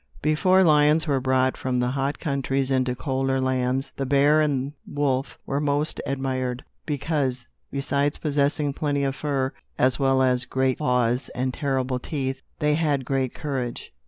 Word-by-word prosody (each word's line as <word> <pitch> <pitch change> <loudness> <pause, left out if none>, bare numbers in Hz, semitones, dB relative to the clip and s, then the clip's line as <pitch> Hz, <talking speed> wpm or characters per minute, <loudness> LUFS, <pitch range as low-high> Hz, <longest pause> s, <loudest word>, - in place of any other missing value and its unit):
Before 185 +5 +4
lions 155 -1 +4
were 140 -3 +1
brought 130 0 +2
from 130 -1 -1
the 125 0 +1
hot 135 +2 -1
countries 135 -2 -1
into 130 -1 +1
colder 135 0 -1
lands, 130 0 0
the 135 - -1
bear 145 +3 +4
and 140 -2 0
wolf 140 -2 -1
were 140 - -1
most 145 +1 0
admired; 130 -2 -2 0.2
because, 140 -4 -1 0.2
besides 140 +1 0
possessing 145 -1 0
plenty 145 -1 -1
of 135 -1 -1
fur, 135 -2 -1 0.2
as 130 -1 +2
well 135 -1 +3
as 125 -1 +2
great 130 0 0
claws 125 -3 +1
and 130 0 -1
terrible 130 -2 -1
teeth, 135 -1 -3 0.2
they 150 0 +2
had 150 -4 +1
great 135 -2 -1
courage. 130 -5 -4
135 Hz, 155 wpm, -24 LUFS, 130-145 Hz, 0.2 s, Before